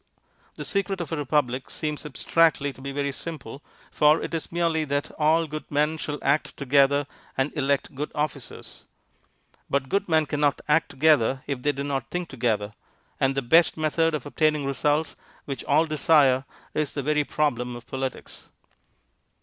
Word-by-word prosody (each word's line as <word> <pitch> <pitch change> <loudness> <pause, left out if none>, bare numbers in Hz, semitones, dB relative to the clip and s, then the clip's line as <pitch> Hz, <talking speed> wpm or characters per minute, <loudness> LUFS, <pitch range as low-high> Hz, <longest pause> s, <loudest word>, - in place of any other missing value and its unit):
The - - -6
secret 195 -1 -1
of 170 -4 -5
a - - 0
republic 135 -3 0
seems 150 0 -4
abstractly 150 -1 +2
to 130 - -15
be 140 +1 -5
very 140 0 -1
simple, 140 -3 -7 0.3
for 150 +1 +4
it - - -5
is 165 - -4
merely 165 -2 +1
that 145 0 -2
all 160 +2 +3
good 155 0 -7
men 150 +2 +1
shall 150 -1 -4
act 145 +3 +1
together 140 +1 +3 0.3
and 135 +2 0
elect 140 -2 0
good 145 +3 -4
officers. 150 -4 -5 0.8
But 135 -1 0
good 200 -2 0
men 160 -1 +3
cannot 145 -1 +1
act 155 +2 +3
together 135 -3 +3
if 140 -3 -3
they 145 - +2
do 140 0 -5
not 135 -3 -3
think 180 -1 -3
together, 110 -5 -1 0.5
and 135 0 +2
the 135 - -1
best 160 +8 +4
method 160 +1 +1
of 150 - -5
obtaining 150 0 +1
results 145 +3 0 0.3
which 135 -2 -5
all 155 +3 +3
desire 145 -4 +3 0.3
is 150 -2 -1
the 140 - -3
very 150 +1 +2
problem 125 -5 -1
of 120 -1 -10
politics. 130 -1 -6
145 Hz, 165 wpm, -25 LUFS, 135-155 Hz, 0.8 s, for